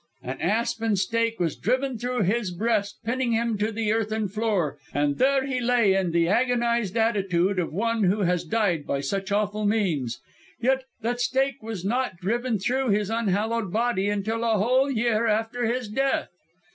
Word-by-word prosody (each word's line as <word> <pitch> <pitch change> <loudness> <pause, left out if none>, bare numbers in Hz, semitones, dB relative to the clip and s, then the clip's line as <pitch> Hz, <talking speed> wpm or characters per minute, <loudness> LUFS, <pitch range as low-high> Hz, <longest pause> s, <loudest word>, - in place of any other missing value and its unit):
"An 130 +2 -5
aspen 225 +2 0
stake 230 +4 0
was 165 -4 0
driven 260 +3 0
through 245 -1 -1
his 210 +2 0
breast, 205 +2 -1
pinning 245 +1 0
him 230 0 +1
to 215 +2 0
the 220 -1 -1
earthern 220 -1 -1
floor, 195 -8 -1 0.2
and 145 0 +1
there 270 0 +3
he 260 -2 -2
lay 235 -5 +3
in 190 -2 +1
the 170 0 +2
agonised 235 -1 +1
attitude 195 -4 +1
of 170 - -2
one 225 +4 0
who 200 +3 +2
had 180 -2 0
died 195 -10 0
by 140 - 0
such 195 +8 -3
awful 210 +1 0
means. 175 - 0 0.4
Yet 265 +2 +1 0.2
that 245 +2 -1
stake 265 +1 0
was 215 -5 -6
not 245 -2 -1
driven 230 +5 -1
through 255 +6 0
his 205 0 +1
unhallowed 225 -1 0
body 220 -2 +1
until 215 +3 -1
a 225 -2 +2
whole 255 +7 +2
year 230 -2 +1
after 225 +2 0
his 245 0 -1
death! 270 +6 0
220 Hz, 170 wpm, -25 LUFS, 195-235 Hz, 0.4 s, there